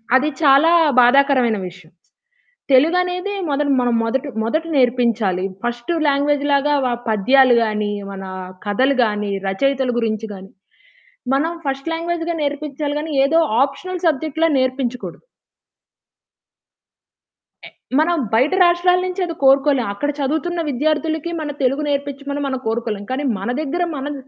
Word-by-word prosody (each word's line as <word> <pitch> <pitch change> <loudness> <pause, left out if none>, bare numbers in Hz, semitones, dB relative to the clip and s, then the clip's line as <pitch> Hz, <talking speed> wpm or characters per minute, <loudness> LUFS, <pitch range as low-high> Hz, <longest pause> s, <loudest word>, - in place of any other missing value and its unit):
అది 290 +4 +3
చాలా 280 +2 +5 0.3
బాధాకరమైన 250 -2 +4
విషయం. 175 -3 -17 0.8
తెలుగనేది 360 +8 +2
మొదట 290 0 0
మనం 245 -1 +1
మొదట 250 +3 -1 0.2
మొదట 310 +8 -1
నేర్పించాలి. 235 -7 +1 0.2
ఫస్ట్ 240 +3 -3 0.2
లాంగ్వేజ్ 285 0 +1
లాగా 280 +1 +2
వ - - +1 0.2
పద్యాలు 245 +4 +4
గాని, 210 -1 -2 0.2
మన 195 -1 -7 0.4
కథలు 255 +7 +1
గాని, 210 -2 -2 0.2
రచయితల 265 +6 0
గురించి 220 -1 -2
గాని, 195 0 -11 0.9
మనం 315 +5 0
ఫస్ట్ 275 +3 -3
లాంగ్వేజ్‌గా 335 0 -2
నేర్పించాలి 290 0 -3
గాని, 310 +1 -5
ఏదో 325 +4 +3 0.2
ఆప్షనల్ 360 +6 -3
సబ్జెక్ట్‌ల 315 +1 +1
నేర్పించకూడదు. 255 -1 -3 2.4
టే - - -10 0.3
మనం 340 +3 +2 0.2
బయట 255 +9 +3
రాష్ట్రాల 350 +1 +3
నుంచి 365 +1 -4
అది 335 -1 -5
కోరుకోలేం. 270 -1 +4
అక్కడ 290 +8 -3
చదువుతున్న 315 +5 -1
విద్యార్థులకి 310 +4 -1
మన 300 -1 -4
తెలుగు 270 +4 +1
నేర్పించమని 280 0 -3
మనం 265 -1 -3
కోరుకోలేం. 225 -2 -2
కానీ 265 +3 -2 0.2
మన 195 - -4
దగ్గర 320 +4 -2
మనం 285 +2 -4
275 Hz, 125 wpm, -19 LUFS, 240-310 Hz, 2.4 s, చాలా